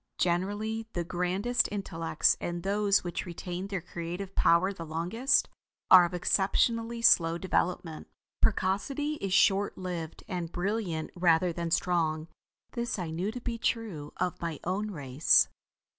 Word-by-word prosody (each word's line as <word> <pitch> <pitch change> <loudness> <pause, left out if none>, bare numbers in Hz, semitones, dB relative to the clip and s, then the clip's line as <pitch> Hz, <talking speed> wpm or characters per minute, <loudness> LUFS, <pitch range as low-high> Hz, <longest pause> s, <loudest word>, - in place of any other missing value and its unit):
Generally 205 +5 -1
the 175 - -1
grandest 185 +7 0
intellects 165 -5 0
and 175 0 -4
those 200 0 +2
which 175 +1 -4
retain 180 +2 -5
their 195 -3 -3
creative 180 +2 -6
power 180 +4 +3
the 170 - -8
longest, 175 - +1 0.4
are 180 -2 +10
of 175 - -5
exceptionally 230 +6 +1
slow 165 -6 +5
development. 175 -3 -2 0.3
Precocity 240 +10 0
is 195 -7 -4
short 195 +1 +3
lived, 175 -3 -5
and 175 -3 -4
brilliant 180 -4 -2
rather 175 0 +3
than 170 0 -3
strong. 165 -2 0 0.4
This 235 -2 -3
I 175 -4 -4
knew 180 +6 -2
to 245 +2 -7
be 235 -1 -4
true 200 -12 -2
of 180 0 -2
my 165 -4 -4
own 200 +4 -2
race. 140 -5 +3
180 Hz, 140 wpm, -29 LUFS, 170-205 Hz, 0.4 s, are